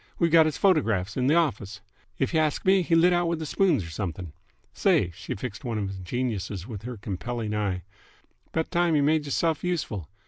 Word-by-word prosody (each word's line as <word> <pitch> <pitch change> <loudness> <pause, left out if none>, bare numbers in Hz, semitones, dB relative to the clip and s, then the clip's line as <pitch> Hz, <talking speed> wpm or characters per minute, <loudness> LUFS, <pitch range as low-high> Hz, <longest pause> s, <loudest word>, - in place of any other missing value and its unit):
We've 170 -2 +2
got 160 -1 +6
h's 155 - -2
photographs 110 - +2
'n 130 -1 +1
th' 155 - +4
office. 105 - 0 0.4
If 135 - -1
y' 160 - +3
ask 155 -1 0
me, 190 0 +5
he 170 -1 +1
lit 175 +2 +5
out 175 0 +2
with 170 0 0
the 160 - -5
spoons 160 - +2
'r 85 - -8
something. 85 -1 -5 0.4
Say!" 90 - +2
She - - -6
fixed 110 +3 -6
one 120 -4 -2
of 100 -2 -3
the 95 - -8
geniuses 105 -3 -3
with 110 -4 -7
her 120 +1 -6
compelling 105 +3 -4
eye. 100 -4 -1 0.7
"'Bout 160 +1 -2
time 175 -2 +2
y' 145 - +3
made 150 +1 +2
y'rself 160 +2 0
useful. 140 - -3
125 Hz, 210 wpm, -26 LUFS, 100-165 Hz, 0.7 s, got